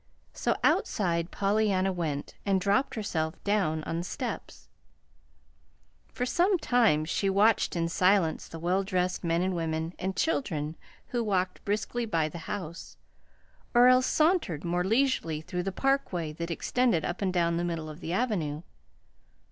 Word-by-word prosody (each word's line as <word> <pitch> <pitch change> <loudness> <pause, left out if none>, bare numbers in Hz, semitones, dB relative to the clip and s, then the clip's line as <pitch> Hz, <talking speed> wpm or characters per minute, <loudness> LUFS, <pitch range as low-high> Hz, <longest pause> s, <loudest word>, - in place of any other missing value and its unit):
So - - 0
outside 170 -4 +1
Pollyanna 195 -2 +1
went 155 -5 -3
and 195 -2 +2
dropped 200 +8 +1
herself 160 -8 -2
down 185 -7 +1
on 165 - -3
the - - -3
steps. - - -6 1.4
For 250 - -2
some 360 +8 +2
time 230 - +3
she 195 +4 0
watched 205 +2 +3
in 165 -1 0
silence 180 -1 +2
the 165 - -8
well 180 +4 0
dressed 185 -2 -1
men, 175 +2 +1
women, 165 0 -2
and 190 +1 -2
children, 165 - -1 0.3
who 240 -1 -1
walked 185 -3 -1
briskly 220 +3 -1
by 160 -6 +1
the 170 - -8
house, 180 -4 -6 0.8
or 245 +1 +8
else 255 0 +5
sauntered 310 - +2
more 175 +1 0
leisurely 220 - +1
through 180 +3 -4
the 195 +2 -2
parkway 190 - 0
that 170 +2 -5
extended 230 +2 +1
up 175 - -4
and 190 -2 +1
down 170 -2 +1
the 175 - -1
middle 165 -2 -3
of 155 +1 -9
the 170 - -5
Avenue. 175 -8 -1
185 Hz, 150 wpm, -28 LUFS, 165-215 Hz, 1.4 s, or